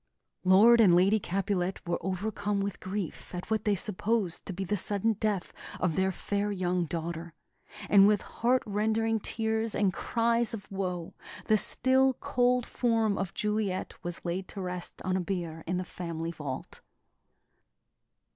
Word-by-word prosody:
Lord 215 +6 +7
and 185 -6 +6
Lady 195 +5 +4
Capulet 190 -1 -1
were 175 - 0
overcome 200 +2 -2
with 200 0 -3
grief 185 -2 -5
at 180 +4 -7
what 220 -1 0
they 210 -1 +3
supposed 205 -1 0
to - - -3
be 190 +1 -4
the 205 +2 -1
sudden 205 +3 +2
death 210 -3 -2 0.3
of 170 -4 0
their 190 0 +2
fair 205 +2 -2
young 180 -2 0
daughter; 165 0 -5 0.5
and 200 -1 +7
with 210 -1 +2
heart 250 +2 +1
rending 220 +2 +1
tears 220 +1 -1
and 195 -3 +2
cries 235 0 0
of 205 - -9
woe, 180 -3 -3 0.3
the 215 - +4
still, 260 +5 +3
cold 245 0 +1
form 225 -4 +1
of 190 -2 -4
Juliet 210 -3 -1
was 175 0 -5
laid 180 +2 -2
to 200 - -8
rest 180 -1 -5
on 185 0 0
a 190 - +1
bier 170 -3 -4
in 180 +1 0
the 185 - -3
family 170 -2 -5
vault. 145 -5 -7
195 Hz, 155 wpm, -29 LUFS, 180-220 Hz, 0.5 s, Lord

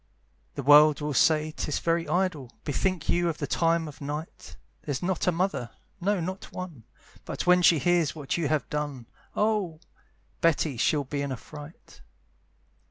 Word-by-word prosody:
The 140 - -4
world 150 +1 +7
will 150 -1 -2
say 155 +2 +3
'tis 155 -1 -3
very 165 0 0
idle, 175 -9 -1
Bethink 170 +3 -1
you 175 0 +2
of 160 - -3
the - - -2
time 165 -1 +1
of 150 -1 -11
night; 150 +3 -6 0.2
There's 145 0 -4
not 185 0 -1
a - - +5
mother, 170 -8 -1 0.3
no 200 +2 +1
not 185 +3 -5
one, 165 -11 -8 0.4
But - - -5
when 180 0 +5
she 170 -2 +6
hears 170 +2 +2
what 145 -4 -3
you 170 -3 0
have 150 0 0
done, 145 -5 -3 0.3
Oh! 210 -7 0 0.6
Betty 160 -3 +2
she'll 145 +5 +2
be 140 +1 -4
in 140 -1 -3
a 130 - -3
fright. 150 - -13
155 Hz, 165 wpm, -27 LUFS, 145-175 Hz, 0.6 s, world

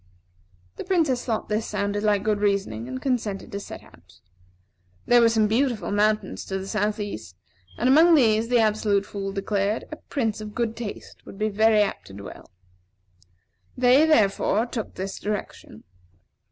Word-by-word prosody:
The - - -5
Princess 320 -10 +1
thought 225 -3 -2
this 215 +1 -1
sounded 205 0 -2
like 205 -2 +1
good 210 -1 0
reasoning, 195 - -1
and 130 0 -5
consented 220 - -2
to 200 - -4
set - - -9
out. - - -21 0.9
There 240 0 +5
were 230 - +5
some 220 -2 +2
beautiful 235 0 0
mountains 210 +1 0
to 190 - -3
the 190 0 -6
south 210 +1 -1
east; 110 - -6 0.4
and 245 - 0
among 320 +6 +6
these, 225 -5 +3
the 245 0 +2
Absolute 210 -2 +2
Fool 195 -1 -5
declared, 200 +2 -1
a 310 - -6
prince 225 -9 -3
of 210 -1 -8
good 230 -2 -1
taste 225 -3 -8
would - - -10
be 215 +1 0
very 215 +1 +4
apt 200 - -5
to - - -12
dwell. 100 0 -11 1.3
They, 255 +5 +5
therefore, 215 -5 +2
took 235 -3 -6
this 190 +1 -5
direction. 210 0 -6
215 Hz, 165 wpm, -24 LUFS, 200-235 Hz, 1.3 s, among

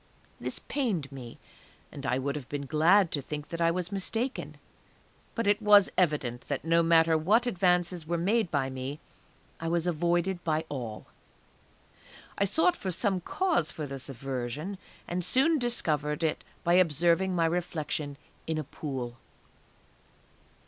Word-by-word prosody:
This - - -2
pained 200 - -2
me, 125 -4 -9 0.5
and 140 -1 -6
I 125 - +1
would 140 +2 -2
have 140 -4 -7
been 145 -1 -3
glad 165 +6 +4
to 145 - -1
think 150 +2 -6
that 170 0 -4
I 165 - +4
was 180 +1 -2
mistaken; 225 +6 -2 0.8
but 230 - -1
it 205 +2 +3
was 205 -2 +6
evident 145 -8 0
that 145 +1 -3
no 165 +1 +4
matter 165 -1 +5
what 205 +10 +3
advances 180 -5 +1
were 170 +1 0
made 200 +3 +1
by 140 -4 0
me, 130 +3 -5 0.6
I 165 - -4
was 170 0 0
avoided 175 +2 0
by 160 0 0
all. 120 -6 -5 1.3
I 200 - +2
sought 320 - +3
for 190 - -4
some 190 0 0
cause 340 - 0
for 155 - -5
this 135 -1 -7
aversion, 135 +8 -4 0.3
and 180 +1 -2
soon 275 - +3
discovered 155 - -1
it 160 - 0 0.2
by 170 - +3
observing 175 +2 +3
my 165 -1 +3
reflection 155 -4 -2 0.3
in 160 -1 -1
a 155 - -1
pool. 130 -4 -5
165 Hz, 150 wpm, -29 LUFS, 145-185 Hz, 1.3 s, was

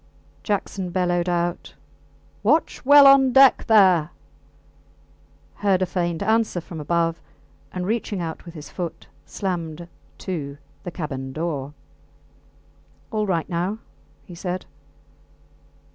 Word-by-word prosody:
Jackson 195 -2 -2
bellowed 175 -1 0
out, 175 0 -2 0.7
Watch 290 +11 +1
well 285 +1 +8
on 275 -1 +7
deck 270 0 +6
there! 185 -8 +5 1.5
heard 195 -2 +2
a - - +2
faint 175 -1 -2
answer 220 -3 +1
from 165 -1 -9
above, 165 +1 0 0.5
and 180 -1 -4
reaching 215 -1 -2
out 165 -2 -5
with 170 -1 -12
his 150 -1 -9
foot 175 -3 -6 0.2
slammed 170 -3 -4 0.3
to 145 -7 -5 0.3
the 180 - -5
cabin 135 -6 -5
door. 150 -2 -4 1.4
All 215 -2 -1
right 170 -4 0
now, 180 +4 -2 0.5
he 180 - -12
said. 180 +1 -4
175 Hz, 115 wpm, -23 LUFS, 165-200 Hz, 1.5 s, well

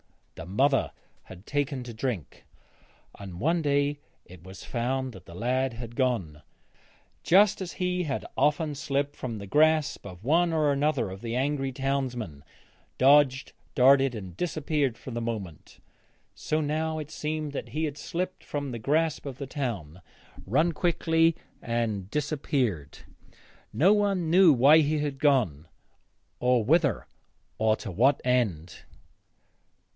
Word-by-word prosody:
The 80 - -9
mother 135 +8 +2 0.3
had 95 +2 -13
taken 145 -2 -2
to 120 -1 -8
drink, 110 - -5 0.7
and 95 -3 -8
one 165 - +1
day 145 0 +1 0.3
it 90 -1 -15
was 95 +1 -11
found 130 +2 -2
that 95 -3 -13
the 85 - -11
lad 125 +3 -1
was 120 -2 -6
gone. 115 - -1 0.8
Just 200 +3 +4
as 180 - -5
he 180 -1 -1
had 135 -3 -3
often 150 +1 +1
slipped 140 0 -2
from 115 -4 -5
the 100 - -7
grasp 155 +6 +2
of 90 -1 -11
one 165 +6 +3
or 155 -2 +2
other 140 -10 0
of 95 +1 -9
the 115 0 -4
angry 135 +1 -1
townsmen, 125 - -3 0.5
dodged, 135 -1 +4 0.2
darted, 135 0 +5
and 95 -5 -8
disappeared 150 - -1
for 130 - -9
the 120 0 -3
moment, 105 -9 -6 0.5
so 155 - -2
now 155 +1 -1
it 155 -1 -6
seemed 155 -1 -3
that 140 - -6
he 155 +2 -3
had 150 -2 -3
slipped 185 +2 -4
from 145 -2 -4
the 120 - -5
grasp 150 +5 0
of 130 -3 -6
the 140 - -5
town, 100 - -5 0.5
run 155 - +2
quickly 165 -1 +2 0.3
and 115 -5 -2
disappeared. 135 - -2 0.7
No 185 +7 +4
one 195 -6 +1
knew 180 -1 +7
why 140 +4 +6
he 155 0 +1
had 145 -2 -3
gone, 115 - +1 0.7
or 125 -2 +2
whither, 145 - +2 0.5
or 110 0 +3
to 105 - -7
what 130 +10 +3
end. 105 -10 0
135 Hz, 145 wpm, -27 LUFS, 115-155 Hz, 0.8 s, knew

